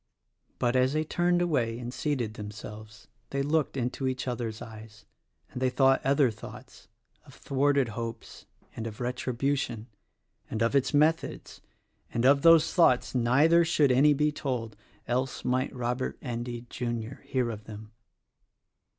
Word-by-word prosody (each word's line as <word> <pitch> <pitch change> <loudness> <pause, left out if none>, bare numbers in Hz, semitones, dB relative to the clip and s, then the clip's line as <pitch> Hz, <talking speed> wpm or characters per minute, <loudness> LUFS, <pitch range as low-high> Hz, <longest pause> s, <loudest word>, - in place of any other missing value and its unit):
But, 120 +1 0
as 130 +1 +3
they 155 0 +1
turned 175 +2 +1
away 125 -9 0
and 120 0 -6
seated 130 -8 -2
themselves 105 0 -9 0.2
they 140 0 -1
looked 150 -1 0
into 130 +2 -2
each 130 0 -3
other's 115 -3 -3
eyes, 110 -1 -11 0.5
and 125 - -6
they 130 - +3
thought 135 +1 +3
other 135 -2 +3
thoughts; 110 - -12 0.4
of - - -16
thwarted 140 -2 +1
hopes, 115 +1 -7 0.3
and 115 - -4
of 110 -1 -8
retribution 125 -1 -2 0.3
— - - -43
and 110 0 -1
of 115 +4 +1
its 135 - +2
methods; 155 +3 0 0.3
— - - -41
and 120 +1 +1
of 140 +1 +5
those 165 -1 +6
thoughts 165 -9 +3
neither 140 +8 +4
should 150 -4 +3
any 145 +4 +5
be 150 +1 +2
told 125 -7 -4 0.2
— - - -33
else 125 +2 -2
might 130 +1 0
Robert 125 0 -3
Endy, 120 -1 -5
Jr., 120 0 -4
hear 125 -3 -1
of 110 -1 -8
them. 110 0 -10
125 Hz, 155 wpm, -28 LUFS, 115-140 Hz, 0.5 s, those